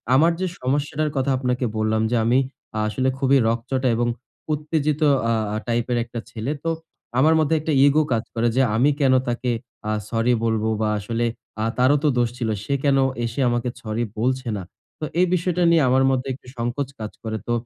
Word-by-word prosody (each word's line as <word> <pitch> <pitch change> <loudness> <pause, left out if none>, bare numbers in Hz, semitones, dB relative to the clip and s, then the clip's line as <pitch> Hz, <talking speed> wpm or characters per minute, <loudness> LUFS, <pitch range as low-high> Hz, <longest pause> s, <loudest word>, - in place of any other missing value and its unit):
আমার 165 +5 +5
যে - - +1 0.2
সমস্যাটার 145 +3 0
কথা 135 +1 +1
আপনাকে 125 -1 -1
বললাম 110 0 +1
যে, - - +2
আমি 120 +3 +4 0.4
আ - - 0
আসলে 130 +4 0
খুবই 135 0 +4
রগচটা 125 +3 0
এবং 120 +1 +1 0.5
উত্তেজিত 150 0 -1 0.3
আ - - +3 0.2
আ - - 0
টাইপের 120 +1 0
একটা 115 0 -6
ছেলে। 120 +6 -3
তো 165 - +2 0.5
আমার 155 +4 +5
মধ্যে 155 +1 +2
একটা 155 -1 -1
ইগো 150 +2 +4
কাজ 115 0 +1
করে 120 0 +1
যে, 135 - +4
"আমি 125 +6 +4
কেন 135 -2 +4
তাকে 120 +1 -1 0.4
আ - - +1 0.2
সরি 115 +2 +2
বলবো? 110 -1 +1
বা 110 - +2
আসলে 115 +4 -2 0.4
আ - - +1
তারও 130 +3 +4
তো - - +3
দোষ 120 -1 +2
ছিল। 115 -3 -2 0.2
সে 140 - -1
কেন 140 -2 +3 0.3
এসে 115 +3 -4
আমাকে 120 +1 0
সরি 110 +1 -2 0.2
বলছে 130 +1 0
না?" 95 - -5 0.4
তো - - -7 0.2
এই 180 - +6
বিষয়টা 180 0 0
নিয়ে 165 -2 +5
আমার 130 +1 +4
মধ্যে 130 +1 -1
একটু 125 - -13
সংকোচ 120 +3 -2
কাজ 105 -1 -5
করে। 110 0 -3
তো - - -1
125 Hz, 195 wpm, -23 LUFS, 115-145 Hz, 0.5 s, এই